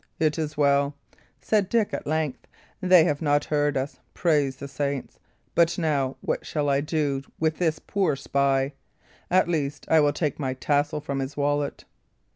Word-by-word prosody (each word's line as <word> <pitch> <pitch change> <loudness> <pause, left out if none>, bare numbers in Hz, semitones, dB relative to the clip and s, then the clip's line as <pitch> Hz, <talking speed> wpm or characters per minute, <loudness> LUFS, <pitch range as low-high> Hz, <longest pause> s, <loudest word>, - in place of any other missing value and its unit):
"It 155 0 +1
is 155 -1 -3
well," 140 0 +3 0.5
said 200 +6 +1
Dick, 230 -3 +1
at - - -4
length; 155 -3 -2 0.3
"they 180 -2 +6
have 150 -3 0
not 145 -2 +2
heard 145 -1 +1
us, 135 +2 -3 0.2
praise 145 -6 +2
the 140 +1 -7
saints! 140 -1 -3 0.3
But, 170 0 +3
now, 140 -6 0
what - - -2
shall 145 -2 -1
I 140 0 +2
do 145 -3 -1 0.2
with 160 -1 0
this 160 -3 +1
poor 190 -8 0
spy? 135 0 +1 0.6
At 185 0 +4
least, 145 -4 -2
I 160 - +6
will 145 -1 +4
take 150 0 -2
my 130 -3 -2
tassel 145 +2 0
from 140 -1 -3
his 135 +2 -4
wallet." 145 0 -1
145 Hz, 170 wpm, -25 LUFS, 140-160 Hz, 0.6 s, they